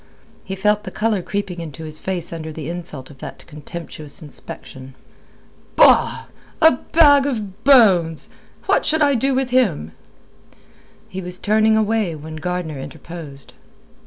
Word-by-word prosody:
He 190 Hz, -, -5 dB
felt 210 Hz, +2 st, +1 dB
the 195 Hz, -, -6 dB
colour 215 Hz, 0 st, 0 dB
creeping 190 Hz, -2 st, -4 dB
into 160 Hz, -1 st, -8 dB
his 155 Hz, 0 st, -3 dB
face 175 Hz, -3 st, -3 dB
under 160 Hz, -1 st, -6 dB
the 155 Hz, +1 st, -6 dB
insult 160 Hz, -6 st, -7 dB
of 135 Hz, -, -16 dB
that -, -, -9 dB
contemptuous 155 Hz, 0 st, -7 dB
inspection. 135 Hz, -4 st, -8 dB, 0.8 s
"Bah! -, -, +5 dB, 0.3 s
A 320 Hz, -1 st, +7 dB
bag 285 Hz, +1 st, +4 dB
of 215 Hz, -5 st, -5 dB
bones. 190 Hz, -, +5 dB, 0.4 s
What -, -, +2 dB
should 315 Hz, 0 st, +2 dB
I 285 Hz, -1 st, +4 dB
do 265 Hz, +2 st, +1 dB
with 260 Hz, -1 st, -1 dB
him?" 195 Hz, -, +1 dB, 1.2 s
He 190 Hz, -, -6 dB
was 180 Hz, 0 st, -6 dB
turning 215 Hz, +2 st, +3 dB
away 215 Hz, -5 st, 0 dB
when 155 Hz, +1 st, -8 dB
Gardner 165 Hz, -3 st, -4 dB
interposed. 155 Hz, -1 st, -9 dB
180 Hz, 140 wpm, -20 LUFS, 155-220 Hz, 1.2 s, A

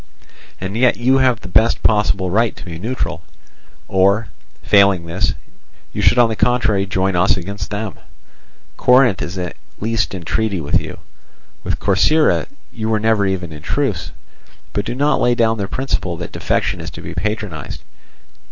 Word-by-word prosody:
And 95 Hz, +2 st, -5 dB
yet 125 Hz, +1 st, +3 dB
you 130 Hz, +3 st, +3 dB
have 125 Hz, -3 st, +2 dB
the -, -, -8 dB
best 110 Hz, +6 st, +2 dB
possible 100 Hz, -4 st, +2 dB
right 110 Hz, +2 st, +2 dB
to -, -, -11 dB
be 85 Hz, -2 st, -7 dB
neutral, 110 Hz, -5 st, -3 dB, 0.7 s
or, 100 Hz, +3 st, +2 dB, 0.3 s
failing 100 Hz, -4 st, +4 dB
this, 85 Hz, -2 st, -1 dB, 0.6 s
you -, -, -2 dB
should -, -, +4 dB
on 120 Hz, -1 st, +6 dB
the 110 Hz, -, -3 dB
contrary 110 Hz, -5 st, +1 dB
join 95 Hz, 0 st, 0 dB
us 90 Hz, +2 st, +3 dB
against 95 Hz, +1 st, -5 dB
them. 105 Hz, -1 st, -4 dB, 0.8 s
Corinth 125 Hz, -5 st, +4 dB
is 90 Hz, +2 st, -5 dB
at 90 Hz, -2 st, -4 dB, 0.2 s
least 110 Hz, -2 st, -1 dB
in 90 Hz, -, -7 dB
treaty 105 Hz, +2 st, -1 dB
with 75 Hz, -2 st, +1 dB
you; -, -, -8 dB, 0.7 s
with -, -, -2 dB
Corcyra 155 Hz, 0 st, +3 dB, 0.3 s
you 110 Hz, -1 st, -3 dB
were 110 Hz, -1 st, +2 dB
never 110 Hz, -2 st, +2 dB
even 90 Hz, -3 st, -3 dB
in 75 Hz, -1 st, -9 dB
truce. -, -, -2 dB, 0.6 s
But 100 Hz, -, -1 dB
do -, -, -3 dB
not 145 Hz, +3 st, +2 dB
lay 120 Hz, 0 st, +3 dB
down 115 Hz, -2 st, +2 dB
the 100 Hz, -, -2 dB
principle 95 Hz, -10 st, -2 dB
that 85 Hz, -, -6 dB
defection -, -, -1 dB
is -, -, -6 dB
to -, -, -10 dB
be -, -, -7 dB
patronized. 95 Hz, -, -4 dB
100 Hz, 170 wpm, -18 LUFS, 95-115 Hz, 0.8 s, on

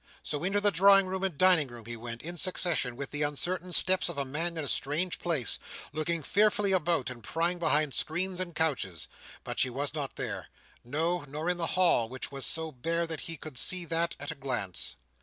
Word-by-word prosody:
So, 145 Hz, +1 st, -3 dB
into 195 Hz, +3 st, +1 dB
the 205 Hz, 0 st, +4 dB
drawing 195 Hz, +1 st, +6 dB
room 190 Hz, +1 st, -3 dB
and 185 Hz, -7 st, -1 dB
dining 180 Hz, -5 st, +5 dB
room 120 Hz, -2 st, -11 dB
he 120 Hz, +1 st, -6 dB
went, 115 Hz, 0 st, -7 dB
in 175 Hz, +2 st, -6 dB
succession, 170 Hz, -7 st, +1 dB
with 140 Hz, +1 st, -6 dB
the 150 Hz, -, -3 dB
uncertain 175 Hz, +5 st, -1 dB
steps 185 Hz, +1 st, +4 dB
of 170 Hz, -, -4 dB
a 140 Hz, -, 0 dB
man 165 Hz, +5 st, -2 dB
in 160 Hz, -, -2 dB
a -, -, -3 dB
strange 155 Hz, +8 st, 0 dB
place; 155 Hz, -10 st, 0 dB, 0.3 s
looking 155 Hz, +1 st, -1 dB
fearfully 205 Hz, +3 st, +3 dB
about, 170 Hz, -8 st, +1 dB
and 120 Hz, -2 st, -10 dB
prying 170 Hz, +8 st, 0 dB
behind 150 Hz, -4 st, +3 dB
screens 180 Hz, +3 st, -1 dB
and 175 Hz, -2 st, -4 dB
couches; 130 Hz, -, -1 dB, 0.4 s
but -, -, -5 dB
she 130 Hz, -, +4 dB
was 140 Hz, +4 st, -2 dB
not 145 Hz, -3 st, -4 dB
there. 100 Hz, -7 st, -4 dB, 0.4 s
No, 165 Hz, +7 st, -1 dB
nor 155 Hz, +5 st, -2 dB
in 180 Hz, -, -2 dB
the 165 Hz, -1 st, 0 dB
hall, 170 Hz, -11 st, +4 dB
which 130 Hz, +2 st, -6 dB
was 135 Hz, -4 st, 0 dB
so 160 Hz, -1 st, 0 dB
bare 165 Hz, +6 st, -1 dB
that 160 Hz, -2 st, -4 dB
he 165 Hz, -, 0 dB
could 150 Hz, -4 st, -3 dB
see 180 Hz, -1 st, +3 dB
that, 165 Hz, +1 st, 0 dB
at 145 Hz, -, -4 dB
a -, -, -3 dB
glance. 120 Hz, -, -3 dB
160 Hz, 215 wpm, -30 LUFS, 135-175 Hz, 0.4 s, drawing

